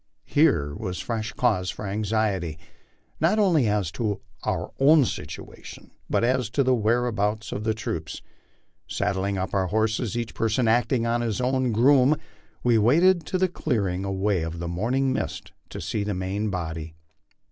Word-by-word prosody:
Here 110 Hz, -, +2 dB
was 90 Hz, +4 st, -4 dB
fresh 110 Hz, 0 st, -3 dB
cause 110 Hz, -10 st, +1 dB
for -, -, -5 dB
anxiety, 100 Hz, -5 st, -1 dB, 0.6 s
not 170 Hz, +8 st, +3 dB
only 170 Hz, -, +3 dB
as 105 Hz, -5 st, 0 dB
to 105 Hz, +1 st, -2 dB, 0.2 s
our -, -, -2 dB
own 145 Hz, +1 st, +6 dB
situation, -, -, -8 dB, 0.2 s
but -, -, +1 dB
as 125 Hz, -1 st, +1 dB
to 140 Hz, -, +5 dB
the 130 Hz, 0 st, +3 dB
whereabouts 110 Hz, -2 st, 0 dB
of 105 Hz, -, -4 dB
the 110 Hz, -1 st, +1 dB
troops. 80 Hz, -7 st, -5 dB, 0.6 s
Sad -, -, -1 dB
dling 100 Hz, +1 st, -1 dB
up 95 Hz, 0 st, -3 dB
our 95 Hz, -2 st, +1 dB
horses, 110 Hz, +3 st, 0 dB
each 115 Hz, -2 st, -3 dB
person 115 Hz, +2 st, +1 dB
acting 120 Hz, +1 st, +2 dB
as 120 Hz, +1 st, +1 dB
his 115 Hz, -2 st, -1 dB
own 130 Hz, 0 st, +1 dB
groom, 130 Hz, +5 st, +5 dB, 0.5 s
we 120 Hz, -2 st, +4 dB
awaited 170 Hz, -, +4 dB
the 185 Hz, 0 st, +1 dB
clearing 100 Hz, -, -1 dB
away 100 Hz, -1 st, 0 dB
of 80 Hz, +1 st, -4 dB
the 85 Hz, 0 st, -4 dB
morning 125 Hz, +10 st, 0 dB
mist -, -, -4 dB, 0.2 s
to -, -, -7 dB
seek 105 Hz, -1 st, -3 dB
the 105 Hz, -, -1 dB
main 95 Hz, +4 st, -2 dB
body. 80 Hz, -3 st, -5 dB
110 Hz, 160 wpm, -25 LUFS, 95-125 Hz, 0.6 s, own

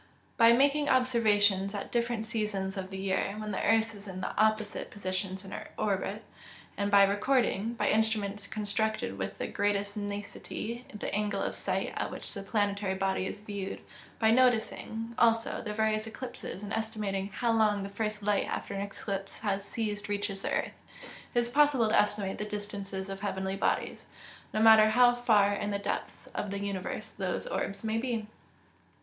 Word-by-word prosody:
_ -, -, -28 dB, 0.3 s
By 230 Hz, -1 st, +7 dB
making 285 Hz, +4 st, +4 dB
observations 210 Hz, -6 st, +3 dB
at 200 Hz, -, -5 dB
different 235 Hz, -2 st, 0 dB
seasons 210 Hz, -4 st, -1 dB
of 190 Hz, -1 st, -4 dB
the 190 Hz, -, -6 dB
year, 190 Hz, +1 st, -1 dB
when 215 Hz, 0 st, -4 dB
the 195 Hz, -, -2 dB
earth 225 Hz, +1 st, +3 dB
is 205 Hz, 0 st, -11 dB
in 185 Hz, -1 st, -5 dB
opposite 215 Hz, -1 st, +1 dB
positions 190 Hz, -1 st, -3 dB
in 195 Hz, -, -9 dB
her -, -, -6 dB
orbit; 205 Hz, +1 st, -1 dB, 0.5 s
and 200 Hz, 0 st, 0 dB
by 200 Hz, -1 st, +7 dB
recording, 225 Hz, +1 st, +1 dB
by -, -, 0 dB
instruments 210 Hz, -2 st, +1 dB
constructed 210 Hz, -, -1 dB
with 95 Hz, 0 st, -3 dB
the -, -, -2 dB
greatest 205 Hz, 0 st, 0 dB
nicety, 205 Hz, +3 st, -5 dB
the 210 Hz, -, -5 dB
angle 205 Hz, -1 st, 0 dB
of -, -, -2 dB
sight, -, -, -2 dB
at -, -, -2 dB
which -, -, -6 dB
the 200 Hz, -, -5 dB
planetary 200 Hz, -1 st, 0 dB
body 190 Hz, 0 st, 0 dB
is 205 Hz, -, -6 dB
viewed; 200 Hz, -2 st, -5 dB, 0.4 s
by 220 Hz, -1 st, +4 dB
noticing, 230 Hz, -2 st, +1 dB
also, 230 Hz, -1 st, +3 dB
the 210 Hz, -, -4 dB
various 215 Hz, 0 st, 0 dB
eclipses, 235 Hz, -4 st, -6 dB
and 205 Hz, -, -5 dB
estimating 210 Hz, -3 st, -2 dB
how 230 Hz, +3 st, 0 dB
long 210 Hz, -3 st, +3 dB
the -, -, -4 dB
first 210 Hz, +1 st, -3 dB
light 205 Hz, -1 st, +2 dB
after -, -, -4 dB
an 195 Hz, -, -2 dB
eclipse 200 Hz, -1 st, -5 dB
has 200 Hz, -2 st, -1 dB
ceased 210 Hz, -1 st, -3 dB
reaches 200 Hz, -1 st, -2 dB
the -, -, -2 dB
earth, -, -, 0 dB, 0.6 s
it -, -, +5 dB
is 240 Hz, 0 st, 0 dB
possible 280 Hz, -5 st, +4 dB
to -, -, +5 dB
estimate 205 Hz, -2 st, 0 dB
the 210 Hz, -, -2 dB
distances 200 Hz, -2 st, -5 dB
of 195 Hz, 0 st, -6 dB
heavenly 190 Hz, -1 st, -2 dB
bodies, 195 Hz, -, -1 dB, 0.5 s
no 215 Hz, -, -1 dB
matter 220 Hz, -1 st, +8 dB
how 245 Hz, +2 st, +6 dB
far 215 Hz, -5 st, +4 dB
in 205 Hz, 0 st, -2 dB
the 200 Hz, -, 0 dB
depths 200 Hz, -, -4 dB
of 205 Hz, -, -3 dB
the 200 Hz, -, -3 dB
universe 200 Hz, -2 st, -3 dB
those -, -, -3 dB
orbs 200 Hz, -, -3 dB
may 220 Hz, 0 st, 0 dB
be. 235 Hz, -3 st, -2 dB
210 Hz, 180 wpm, -30 LUFS, 200-225 Hz, 0.6 s, matter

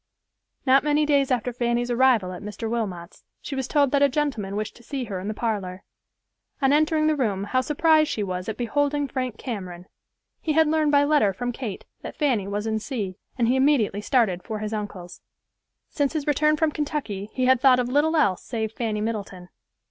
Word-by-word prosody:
Not 265 Hz, +1 st, +5 dB
many 300 Hz, 0 st, +2 dB
days 280 Hz, -2 st, +2 dB
after 250 Hz, -1 st, 0 dB
Fanny's 240 Hz, 0 st, 0 dB
arrival 240 Hz, -6 st, +3 dB
at 180 Hz, -, -8 dB
Mr. 210 Hz, +2 st, -5 dB
Wilmot's 195 Hz, -7 st, -4 dB, 0.2 s
she -, -, -7 dB
was 265 Hz, -1 st, -2 dB
told 285 Hz, -3 st, +2 dB
that 280 Hz, -, +2 dB
a 285 Hz, -, +5 dB
gentleman 250 Hz, -9 st, -2 dB
wished 215 Hz, 0 st, -4 dB
to -, -, -16 dB
see 270 Hz, +2 st, -4 dB
her 200 Hz, -5 st, -5 dB
in 190 Hz, -, -6 dB
the 215 Hz, -, -2 dB
parlor. 195 Hz, -6 st, -3 dB, 0.8 s
On 275 Hz, -2 st, +3 dB
entering 310 Hz, +1 st, +3 dB
the 310 Hz, 0 st, +3 dB
room 210 Hz, -8 st, -1 dB
how 255 Hz, +6 st, +1 dB
surprised 310 Hz, +2 st, +3 dB
she 210 Hz, -, -2 dB
was 185 Hz, 0 st, -4 dB
at 220 Hz, -, -4 dB
beholding 285 Hz, +4 st, 0 dB
Frank 255 Hz, -5 st, -3 dB
Cameron. 185 Hz, -7 st, -6 dB, 0.6 s
He 310 Hz, -, 0 dB
had 320 Hz, +1 st, +5 dB
learned 310 Hz, -1 st, +2 dB
by 285 Hz, -1 st, +5 dB
letter 285 Hz, -9 st, +3 dB
from 245 Hz, +5 st, -3 dB
Kate 230 Hz, -5 st, -6 dB, 0.2 s
that -, -, -8 dB
Fanny 250 Hz, -10 st, +1 dB
was 205 Hz, +1 st, -3 dB
in 220 Hz, -1 st, -1 dB
C——, 210 Hz, -6 st, -4 dB, 0.2 s
and 235 Hz, -2 st, +2 dB
he 250 Hz, -, +3 dB
immediately 260 Hz, -7 st, +2 dB
started 210 Hz, -6 st, +1 dB
for 220 Hz, -, -5 dB
his 215 Hz, +1 st, -4 dB
uncle's. 205 Hz, -4 st, -6 dB, 0.7 s
Since 285 Hz, -1 st, 0 dB
his 305 Hz, -3 st, -2 dB
return 305 Hz, +1 st, +2 dB
from 315 Hz, 0 st, +2 dB
Kentucky 285 Hz, -10 st, -3 dB
he 255 Hz, -, 0 dB
had 260 Hz, -1 st, +4 dB
thoughts 260 Hz, -2 st, +6 dB
of 245 Hz, -, -2 dB
little 295 Hz, +5 st, +2 dB
else 200 Hz, -, +2 dB
save 220 Hz, -3 st, -3 dB
Fanny 220 Hz, -2 st, -2 dB
Middleton. 200 Hz, -5 st, -4 dB
245 Hz, 200 wpm, -24 LUFS, 210-285 Hz, 0.8 s, thoughts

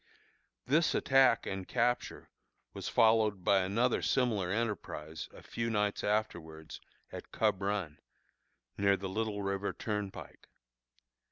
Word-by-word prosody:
This 155 Hz, +5 st, +2 dB
attack 135 Hz, -3 st, +4 dB
and 95 Hz, -1 st, -4 dB
capture 120 Hz, +1 st, -1 dB, 0.4 s
was -, -, -5 dB
followed 110 Hz, -4 st, +3 dB
by 100 Hz, +1 st, +4 dB
another 110 Hz, +7 st, +1 dB
similar 110 Hz, -8 st, +1 dB
enterprise 95 Hz, -7 st, -3 dB
a -, -, -14 dB
few 115 Hz, 0 st, -3 dB
nights 105 Hz, -2 st, 0 dB
afterwards 85 Hz, -7 st, -3 dB, 0.3 s
at -, -, -9 dB
Cub 95 Hz, -, +1 dB
Run, 95 Hz, -6 st, -2 dB, 0.8 s
near 100 Hz, 0 st, +3 dB
the 95 Hz, -, -5 dB
Little 105 Hz, +1 st, -2 dB
River 100 Hz, 0 st, -2 dB
Turnpike. 105 Hz, -3 st, -5 dB
105 Hz, 115 wpm, -32 LUFS, 95-115 Hz, 0.8 s, attack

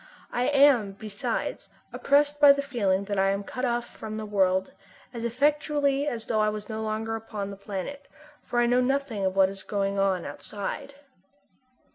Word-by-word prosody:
I 245 Hz, +1 st, 0 dB
am, 275 Hz, -8 st, +4 dB
besides, 200 Hz, 0 st, -4 dB, 0.2 s
oppressed 290 Hz, +1 st, +2 dB
by 285 Hz, -1 st, +9 dB
the 280 Hz, 0 st, -2 dB
feeling 200 Hz, -8 st, 0 dB
that 200 Hz, -1 st, -2 dB
I 195 Hz, 0 st, +3 dB
am 200 Hz, +1 st, -1 dB
cut 255 Hz, +5 st, -4 dB
off 240 Hz, -1 st, 0 dB
from 215 Hz, -2 st, -8 dB
the 220 Hz, -, -4 dB
world, 190 Hz, -2 st, +1 dB, 0.4 s
as 235 Hz, -1 st, -4 dB
effectually 285 Hz, +2 st, +1 dB
as 230 Hz, -5 st, -3 dB
though 220 Hz, -, 0 dB
I 215 Hz, 0 st, +3 dB
were 215 Hz, 0 st, -3 dB
no 220 Hz, -1 st, -4 dB
longer 220 Hz, +1 st, -2 dB
upon 210 Hz, -3 st, -5 dB
our -, -, -7 dB
planet, 200 Hz, +8 st, -6 dB, 0.3 s
for 240 Hz, -, -5 dB
I 240 Hz, -, +4 dB
know 245 Hz, +1 st, +3 dB
nothing 260 Hz, -5 st, -1 dB
of 190 Hz, 0 st, 0 dB
what 190 Hz, -1 st, +5 dB
is 195 Hz, 0 st, -6 dB
going 200 Hz, -1 st, -1 dB
on 190 Hz, -3 st, +1 dB
outside. 210 Hz, -, -6 dB
220 Hz, 180 wpm, -27 LUFS, 200-275 Hz, 0.4 s, by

